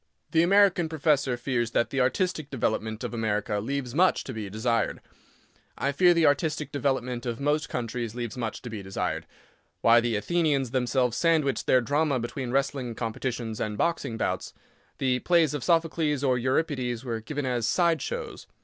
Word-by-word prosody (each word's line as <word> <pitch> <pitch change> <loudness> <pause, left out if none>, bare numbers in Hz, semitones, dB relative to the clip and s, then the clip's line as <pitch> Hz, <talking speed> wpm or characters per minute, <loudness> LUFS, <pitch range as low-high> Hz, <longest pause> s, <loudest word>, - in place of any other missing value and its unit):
The 160 - +4
American 185 -2 +4
professor 145 -5 +1
fears 120 -2 -1
that 115 - +1
the 135 - +1
artistic 155 +3 0
development 110 -4 -2
of - - -4
America 105 -1 -1
leaves 125 +2 -3
much 180 +3 +3
to 130 - -6
be 110 -3 -5
desired. 115 +2 0 0.8
I 140 - 0
fear 175 +4 +4
the 165 -1 +4
artistic 150 +1 +1
development 125 -3 -1
of 115 -1 -3
most 145 +2 0
countries 115 -1 -3
leaves 120 -1 -4
much 115 -3 -4
to 125 - -6
be 110 -2 -5
desired. 95 0 -3 0.5
Why 115 +1 +6
the 120 -1 0
Athenians 145 0 +1
themselves 125 -1 +1
sandwiched 160 -5 +1
their 130 - +5
drama 145 +1 +1
between 120 +2 -4
wrestling 135 -2 -1
competitions 115 -1 -3
and 105 -1 -2
boxing 165 -8 -1
bouts. - - -2 0.4
The 125 -1 +1
plays 170 -3 +3
of 145 -4 -3
Sophocles, 160 -2 +1
or 130 -2 +3
Euripides, 130 -2 -1
were 115 -2 -2
given 145 +4 -4
as 120 -3 0
"side 170 0 +2
shows." - - -5
130 Hz, 165 wpm, -27 LUFS, 115-150 Hz, 0.8 s, Why